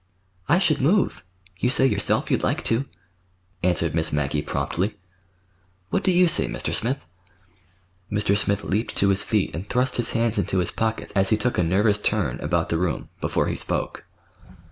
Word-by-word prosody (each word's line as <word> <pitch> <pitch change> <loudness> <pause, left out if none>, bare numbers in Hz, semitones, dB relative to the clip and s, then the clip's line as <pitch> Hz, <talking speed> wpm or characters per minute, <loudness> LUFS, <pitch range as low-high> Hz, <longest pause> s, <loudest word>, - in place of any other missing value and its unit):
"I 170 - +5
should 160 -7 +2
move. 180 +8 +2 0.4
You 125 - +1
say 130 - +4
yourself 135 - +2
you'd - - +2
like - - -1
to," 115 +4 +1 0.8
answered 85 -3 +1
Miss 80 -1 +1
Maggie 75 0 0
promptly. 95 +7 -2 0.9
"What - - 0
do 190 - +2
you 180 0 +5
say, 165 - +3
Mr. - - -4
Smith?" 130 +5 -1 1.1
Mr. 105 -1 +2
Smith 100 0 0
leaped 105 +4 -2
to 100 - +2
his 95 0 +2
feet 105 -3 0
and 95 +5 -6
thrust 125 +1 0
his 120 -2 +1
hands 115 -2 +1
into 95 0 -1
his 90 -2 0
pockets 110 0 -2
as 95 -1 +2
he 110 - +3
took 120 0 0
a - - +3
nervous 100 +5 +2
turn 100 - -1
about 80 +2 -1
the 85 - 0
room, 90 -2 -2
before - - 0
he - - -2
spoke. - - -2
105 Hz, 180 wpm, -24 LUFS, 90-120 Hz, 1.1 s, I